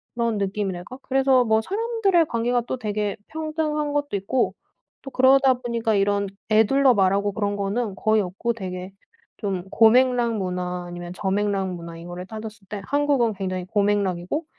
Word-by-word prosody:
그런 235 -2 0
느낌이랄까 195 +2 -3
그래서 265 -2 +3
뭐 220 0 +3
사람들의 400 - +1
관계가 240 +1 0
또 - - -2
되게 210 -3 -2
평등한 305 -2 -2
것도 290 -8 -1
있고 220 +6 0 0.5
또 270 - -9
그러다 265 0 +5
보니까 235 -3 -1
이런 200 0 +1 0.2
에둘러 250 +5 +5
말하고 200 0 +2
그런 205 -1 -1
거는 200 +1 -2
거의 215 +1 +2
없고 195 +6 -2
되게 185 -3 -6 0.5
좀 190 -3 -3
고맥락 240 0 +4
문화 180 -1 -3
아니면 175 0 -7
저맥락 195 0 -1
문화 170 -1 -8
이거를 175 +2 -8
따졌을 215 -2 -9
때 205 0 -6
한국은 285 -5 +2
굉장히 185 -2 -3
고맥락이고 200 - 0
215 Hz, 350 characters per minute, -23 LUFS, 195-255 Hz, 0.5 s, 그러다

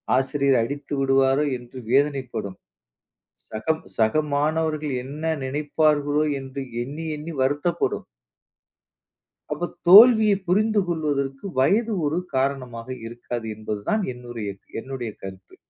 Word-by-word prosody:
"ஆசிரியர் 135 +1 +2
அடித்து 140 +4 -5
விடுவாரோ!" 135 +1 +3
என்று 125 +1 -13
வேதனைப்படும். 135 -8 0 0.9
"சகம் 155 +9 -2 0.2
சக 115 +7 +3
மாணவர்கள் 155 0 0
என்ன 155 +4 -2
நினைப்பார்களோ!" 150 +1 +1 0.2
என்று 135 +1 -6 0.2
எண்ணி, 145 +6 -6
எண்ணி 160 +2 -7
வருத்தப்படும். 145 +6 0 1.5
அப்போ 175 - -3 0.2
தோல்விய 220 +2 +9
புரிந்து 210 +3 +3
கொள்வதற்கு 145 -3 -2
வயது 215 - +3
ஒரு 160 +4 0 0.2
காரணமாக 130 -3 -2 0.2
இருக்காது 120 0 -6
என்பது 105 -1 -5
தான் 215 -1 +1
என்னுருய்ய 120 -4 -6 0.3
என்னுடைய 130 -4 -5
கருத்து. 95 -1 -10
140 Hz, 105 wpm, -24 LUFS, 125-155 Hz, 1.5 s, தோல்விய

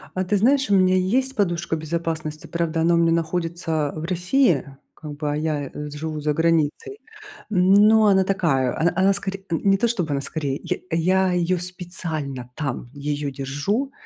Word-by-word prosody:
А 185 - 0
ты 205 - +1
знаешь, 265 +3 +3
у 200 - +4
меня 185 0 +4
есть 255 +9 +1
подушка 175 -5 0
безопасности, 160 -1 -4
правда 165 -1 -1
она 170 +1 +3
у - - +3
меня 165 0 +3
находится 165 -2 -1
в 155 - -5
России, 180 - +2 0.3
как 150 -2 -9
бы, 150 -1 -2
а - - -1
я 150 -3 -2
живу 150 +1 -5
за 150 0 0
границей. 165 - 0 0.5
Но 210 +3 +5
она 190 -1 +4
такая, 165 -10 0
она 165 +2 +2
она 190 +1 +4
скоре 195 0 -5
не 195 +4 +2
то, 235 - +1
чтобы 180 -10 -2
она 140 -1 0
скорее, 140 -2 -3
я - - -2
я 185 +3 +2
её 180 +1 +1
специально 160 -8 -5
там 135 -4 -4
её 145 0 -3
держу, 145 - -2
170 Hz, 170 wpm, -23 LUFS, 150-190 Hz, 0.5 s, Но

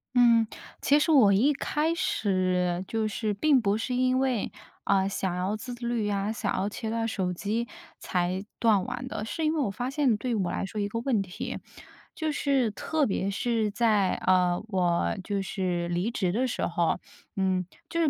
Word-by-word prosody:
嗯。 235 -2 +5 0.3
其 290 +1 +4
实 320 - +2
我 235 -10 +6
一 260 +10 +4
开 300 +3 0
始， 185 - 0
就 225 -1 -1
是 215 0 -2
并 270 +5 +3
不 205 -1 +1
是 240 +3 -3
因 255 +1 +2
为， 260 -5 0 0.3
嗯， 195 -1 +3
想 190 -2 -2
要 185 +3 -1
自 245 +3 -6
律 240 -2 -2
呀， 200 0 0
想 220 - -2
要 195 +2 0
切 220 +1 -5
断 225 0 -1
手 190 -5 -1
机 215 +6 -2 0.3
才 180 +1 -1 0.2
断 215 -5 +4
网 255 +1 -5
的。 215 - -4
是 320 +8 -3
因 310 - +2
为 320 - -1
我 270 - +1
发 245 +6 -3
现 275 -4 +2
对 240 +1 -2
我 185 -4 0
来 - - -2
说 210 +2 -5
一 200 - 0
个 230 +3 -3
问 235 -3 +1
题， 180 -2 -5 0.6
就 315 -2 -1
是 275 -6 +1
特 305 +8 0
别 195 -3 -1
是 220 +2 0
在， 210 -3 +2
呃， 180 -1 +3
我 180 -1 +1
就 200 +1 -1
是 180 -2 -2
离 175 +5 0
职 190 -6 0
的 245 +7 +1
时 245 - -1
候， 170 -1 0 0.4
嗯， 185 -2 +1 0.2
就 335 - 0
是 325 - +3
215 Hz, 205 characters per minute, -27 LUFS, 190-250 Hz, 0.6 s, 我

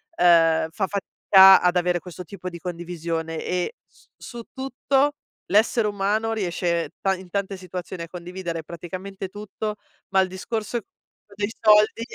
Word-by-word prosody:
ehm, 165 - +4
fa 195 +2 -1
fatica 195 -1 +6
ad 180 0 +2
avere 180 0 +1
questo 180 +1 -9
tipo 185 +1 -7
di 170 - -8
condivisione, 165 -2 -4
e 180 - -2
s - - -26
su 240 -2 -9
tutto, 270 +1 0 0.4
l'essere 215 +2 +3
umano 210 +2 0
riesce 175 -4 -1
ta 195 - +2
in 185 -1 -8
tante 200 0 -2
situazioni, 180 -1 -7
a - - -7
condividere 175 -1 -6
praticamente 185 +4 -7
tutto, 210 +2 -5 0.3
ma 190 -1 +4
il 185 - 0
discorso 220 +4 -3 0.6
dei 205 +1 -2
soldi 215 +1 +5
190 Hz, 145 wpm, -24 LUFS, 175-210 Hz, 0.6 s, fatica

